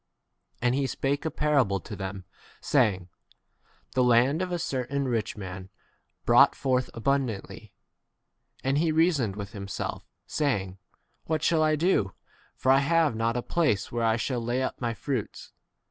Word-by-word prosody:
And 120 0 +3
he 135 0 +1
spake 140 +3 -2
a - - +1
parable 140 -10 +1
to 105 - -8
them, 95 -1 -6 0.3
saying, 100 -10 +1 0.8
The 130 - +3
land 125 +6 +4
of 185 -1 -2
a 175 - 0
certain 140 -3 -2
rich 115 -3 -2
man 95 -2 -7
^ - - -19 0.6
brought - - +6
forth 130 -2 0
abundantly. 125 -4 -2 0.9
And 135 +2 +1
he 165 0 +2
reasoned 155 - +2
within 100 0 -7
himself, 100 0 -4 0.2
say 140 -10 0
ing, 95 0 -11 0.5
What 155 -1 -1
shall 165 -2 +3
I 155 0 +3
do? 150 - +1 0.4
for 130 - +2
I 135 - +6
have 155 -2 +2
not 115 +2 0
[a 120 - -2
place] 150 - 0
where 120 0 -1
I 110 -1 +3
shall 120 +1 -2
lay 120 +3 -1
up - - -3
w 120 - -2
my 115 - -4
fruits. 130 -6 -4
125 Hz, 165 wpm, -27 LUFS, 110-145 Hz, 0.9 s, brought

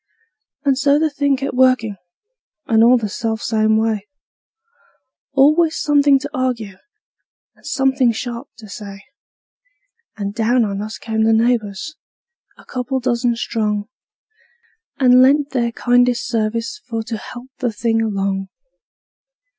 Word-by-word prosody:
And 270 -2 +2
so 280 0 +3
the 310 0 +1
thing 285 -1 +1
kept 275 - -4
workin', 255 -4 +2 0.7
and 225 -5 +3
all 245 +2 +6
the 220 -3 -2
self 220 +2 -3
same 220 -1 +2
way; 220 -2 -1 1.3
Always 305 +4 +3
somethin' 285 -1 +4
to 290 +1 -6
arg'e, 245 -7 -2 0.8
and - - -24
somethin' 265 -3 +2
sharp 240 +3 -5
to 220 -2 -12
say; 200 -1 -9 1.1
And 200 -1 -4
down 230 +2 +2
on 200 -1 -3
us 215 +1 -6
came 220 -1 -2
the 225 0 +3
neighbors, 225 - 0 0.6
a - - -18
couple 255 +1 -3
dozen 240 -1 0
strong, 215 -3 -2 1.1
And 255 -2 +5
lent 285 +2 +3
their 235 -3 0
kindest 245 +1 +2
sarvice 230 - -2
for 225 -2 -3
to 225 0 -5
help 245 +4 -10
the 245 -3 -1
thing 225 +1 0
along. 195 -3 -2
235 Hz, 130 wpm, -19 LUFS, 220-265 Hz, 1.3 s, all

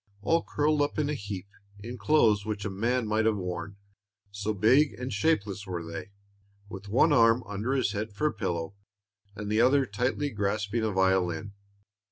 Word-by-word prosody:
All 165 +8 +2
curled 150 0 +1
up 145 - -1
in 150 -1 0
a - - -1
heap, 100 -8 -5 0.3
in 120 +4 -8
clothes 110 -9 +3
which 105 -1 -4
a 105 - -2
man 115 +5 0
might 110 +1 +1
have 110 -2 +2
worn, 90 +1 -5 0.6
so 100 +2 -3
big 125 +9 +3
and 125 -1 -5
shapeless 100 -5 0
were 90 -2 -4
they, 85 +3 -7 0.6
with 100 -1 -9
one 140 +8 +4
arm 115 -1 +5
under 105 +6 -3
his 130 -3 +1
head 105 +1 -4
for 100 +8 -3
a 150 - +2
pillow, 90 -4 -3 0.6
and 105 0 -6
the 110 +2 +2
other 135 +2 +4
tightly 125 +6 -1
grasping 105 +2 -1
a 110 - +1
violin. 95 0 +1
105 Hz, 180 wpm, -28 LUFS, 100-125 Hz, 0.6 s, arm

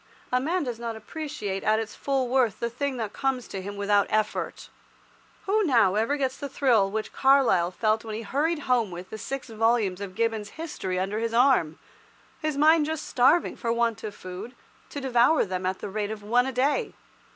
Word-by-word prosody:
A 250 - +3
man 335 +5 0
does 245 -4 -4
not 230 -1 -4
appreciate 220 -5 -5
at 215 0 +3
its 220 -1 -4
full 270 -2 -1
worth 245 -4 +1
the 235 0 -2
thing 270 +2 -2
that 220 -3 -4
comes 265 -3 -1
to 195 - -5
him 200 +2 -7
without 200 0 +2
effort. 215 -1 -2 0.8
Who 425 +2 +2
now 230 - +4
ever 225 +8 +1
gets 265 -1 -1
the 285 - -5
thrill 240 -8 +3
which 215 +2 -4
Carlyle 265 -11 +4
felt 215 +4 0
when 220 -2 -5
he 225 - -5
hurried 300 +8 0
home 245 -6 +1
with 180 +1 -9
the 220 - -6
six 270 +3 -5
volumes 220 -4 +1
of 190 -2 -6
Gibbon's 225 0 -2
"History" 300 - -4
under 195 +3 -1
his 230 0 -2
arm, 240 - +3 0.6
his 310 -3 -1
mind 305 +1 +5
just 315 -1 -3
starving 265 +7 +3
for 230 - -2
want 235 -2 0
of 210 -1 -5
food, 185 +7 -8 0.3
to 285 - -6
devour 255 +3 +3
them 185 -1 -3
at 190 0 -1
the - - -4
rate 205 +1 -2
of 215 -1 -6
one 245 +4 +2
a - - -2
day? 275 - 0
230 Hz, 200 wpm, -26 LUFS, 205-270 Hz, 0.8 s, mind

